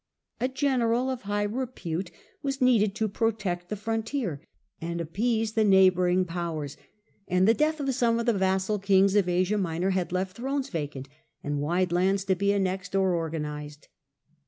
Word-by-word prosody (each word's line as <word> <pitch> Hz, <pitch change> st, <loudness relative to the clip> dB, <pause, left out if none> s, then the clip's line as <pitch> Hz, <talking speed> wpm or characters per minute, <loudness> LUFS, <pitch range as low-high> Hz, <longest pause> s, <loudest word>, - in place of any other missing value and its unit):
A 250 Hz, -, +1 dB
general 260 Hz, -2 st, +1 dB
of 255 Hz, -1 st, -4 dB
high 205 Hz, 0 st, -1 dB
repute 205 Hz, -7 st, -3 dB, 0.3 s
was 275 Hz, -1 st, -2 dB
needed 225 Hz, -6 st, +3 dB
to 220 Hz, -1 st, 0 dB
protect 195 Hz, -5 st, -2 dB
the 210 Hz, -, -2 dB
frontier 225 Hz, -, -3 dB, 0.4 s
and 170 Hz, +1 st, -3 dB
appease 220 Hz, +6 st, -1 dB
the 220 Hz, -, +3 dB
neighbouring 185 Hz, -2 st, +4 dB
powers, 165 Hz, -5 st, -4 dB, 0.5 s
and 180 Hz, +1 st, +3 dB
the 225 Hz, -, +6 dB
death 310 Hz, +5 st, +1 dB
of 275 Hz, -2 st, -1 dB
some 235 Hz, -2 st, +2 dB
of 235 Hz, -, -2 dB
the 235 Hz, -, +3 dB
vassal 190 Hz, +1 st, +1 dB
kings 195 Hz, 0 st, +4 dB
of 195 Hz, -3 st, +3 dB
Asia 185 Hz, +4 st, +1 dB
Minor 180 Hz, +1 st, 0 dB
had 185 Hz, -2 st, -1 dB
left 185 Hz, +1 st, -2 dB
thrones 270 Hz, +2 st, -2 dB
vacant, 145 Hz, -5 st, -4 dB, 0.4 s
and 145 Hz, 0 st, -2 dB
wide 175 Hz, +4 st, 0 dB
lands 190 Hz, +2 st, +2 dB
to 190 Hz, 0 st, +2 dB
be 200 Hz, +2 st, +1 dB
annexed 195 Hz, -1 st, -1 dB
or 190 Hz, -1 st, +3 dB
orga 165 Hz, -2 st, -2 dB
nized. 150 Hz, 0 st, -7 dB
195 Hz, 170 wpm, -27 LUFS, 175-225 Hz, 0.5 s, the